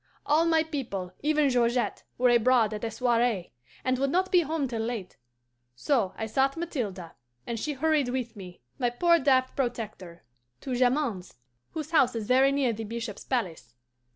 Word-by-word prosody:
All 310 Hz, +3 st, +3 dB
my 320 Hz, -1 st, +3 dB
people, 235 Hz, -, -5 dB
even 300 Hz, -1 st, +2 dB
Georgette, 240 Hz, 0 st, +1 dB
were 250 Hz, 0 st, +4 dB
abroad 240 Hz, -2 st, +4 dB
at 210 Hz, -, -6 dB
a 230 Hz, -, -1 dB
soiree, 230 Hz, -4 st, 0 dB, 0.3 s
and 255 Hz, 0 st, 0 dB
would 275 Hz, 0 st, +1 dB
not 370 Hz, +5 st, +1 dB
be 360 Hz, -, +6 dB
home 315 Hz, -3 st, -1 dB
till 230 Hz, -3 st, -3 dB
late. 225 Hz, -5 st, -4 dB, 0.6 s
So 225 Hz, -, 0 dB
I 220 Hz, -, -3 dB
sought 270 Hz, +6 st, +1 dB
Mathilde, 210 Hz, -, -4 dB, 0.3 s
and 230 Hz, -1 st, -4 dB
she 300 Hz, +6 st, -2 dB
hurried 295 Hz, -1 st, +1 dB
with 245 Hz, -2 st, -3 dB
me, 180 Hz, -3 st, -11 dB, 0.2 s
my 245 Hz, -2 st, +2 dB
poor 335 Hz, +8 st, +3 dB
daft 260 Hz, -2 st, +2 dB
protector, 220 Hz, -9 st, -4 dB, 0.4 s
to 265 Hz, -, -4 dB
Jamond's, 245 Hz, -, 0 dB, 0.4 s
whose 315 Hz, 0 st, -5 dB
house 285 Hz, -7 st, +3 dB
is 225 Hz, -2 st, -3 dB
very 260 Hz, +4 st, +4 dB
near 275 Hz, -4 st, +1 dB
the 225 Hz, +1 st, -5 dB
bishop's 225 Hz, -1 st, -6 dB
palace. 190 Hz, -, -3 dB
245 Hz, 170 wpm, -27 LUFS, 225-280 Hz, 0.6 s, be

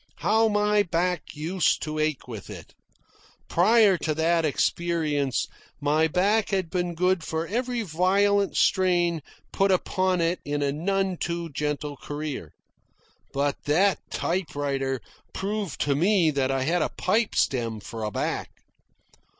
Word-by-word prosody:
How 225 Hz, +1 st, +3 dB
my 210 Hz, 0 st, +3 dB
back 180 Hz, -1 st, 0 dB
used 165 Hz, +4 st, 0 dB
to 155 Hz, 0 st, -3 dB
ache 155 Hz, -4 st, -1 dB
with 110 Hz, -5 st, -8 dB
it! -, -, -10 dB, 0.7 s
Prior 205 Hz, 0 st, +4 dB
to 155 Hz, -2 st, -1 dB
that 165 Hz, +1 st, +2 dB
experience, 155 Hz, -3 st, 0 dB, 0.3 s
my 150 Hz, +2 st, +2 dB
back 200 Hz, +6 st, +2 dB
had 190 Hz, -4 st, -1 dB
been 175 Hz, -2 st, -1 dB
good 180 Hz, 0 st, +1 dB
for 160 Hz, +1 st, -2 dB
every 245 Hz, +4 st, -2 dB
violent 200 Hz, +3 st, +2 dB
strain 175 Hz, -3 st, +2 dB, 0.3 s
put 195 Hz, 0 st, +2 dB
upon 185 Hz, 0 st, +1 dB
it 170 Hz, +2 st, +1 dB
in 145 Hz, 0 st, -2 dB
a 140 Hz, -, +1 dB
none 190 Hz, +4 st, -1 dB
too 170 Hz, 0 st, -3 dB
gentle 150 Hz, 0 st, -3 dB
career. 145 Hz, -, -5 dB, 0.8 s
But 140 Hz, +1 st, -1 dB
that 185 Hz, +7 st, +3 dB
typewriter 140 Hz, -7 st, -2 dB, 0.3 s
proved 200 Hz, -4 st, -3 dB
to 145 Hz, -, +2 dB
me 175 Hz, +2 st, +3 dB
that 135 Hz, -2 st, 0 dB
I 135 Hz, -1 st, 0 dB
had 170 Hz, +5 st, +1 dB
a -, -, +1 dB
pipe 215 Hz, +4 st, +1 dB
stem 115 Hz, -4 st, 0 dB
for 110 Hz, +2 st, -7 dB
a 105 Hz, -, -1 dB
back. -, -, -2 dB
170 Hz, 140 wpm, -26 LUFS, 145-190 Hz, 0.8 s, Prior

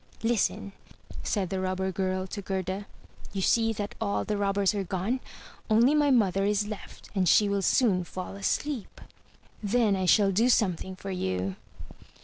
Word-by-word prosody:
"Listen, 225 Hz, -3 st, 0 dB, 0.5 s
said 195 Hz, -4 st, -1 dB
the 190 Hz, -, -1 dB
Robber 185 Hz, 0 st, -1 dB
girl 185 Hz, 0 st, -1 dB
to 200 Hz, +2 st, -6 dB
Gerda, 190 Hz, +1 st, -3 dB, 0.5 s
"you 195 Hz, -2 st, -2 dB
see 225 Hz, +2 st, +3 dB
that 205 Hz, -1 st, -4 dB
all 200 Hz, -2 st, 0 dB
the 210 Hz, -, -1 dB
robbers 200 Hz, -1 st, +1 dB
are 200 Hz, -2 st, -1 dB
gone. 190 Hz, +7 st, -2 dB, 0.5 s
Only 235 Hz, +6 st, +5 dB
my 295 Hz, -1 st, +3 dB
mother 195 Hz, -7 st, +3 dB
is 205 Hz, +1 st, +1 dB
left 215 Hz, -1 st, -9 dB
and 185 Hz, -4 st, +2 dB
she 210 Hz, -, +5 dB
will 200 Hz, 0 st, 0 dB
soon 195 Hz, -3 st, +3 dB
fall 185 Hz, +2 st, -7 dB
asleep. 235 Hz, +4 st, -2 dB, 0.6 s
Then 215 Hz, -1 st, +2 dB
I 185 Hz, -1 st, -1 dB
shall 200 Hz, +2 st, +5 dB
do 225 Hz, +6 st, +3 dB
something 190 Hz, -5 st, +1 dB
for 195 Hz, +1 st, -7 dB
you. 95 Hz, -, -2 dB
200 Hz, 160 wpm, -28 LUFS, 185-215 Hz, 0.6 s, Only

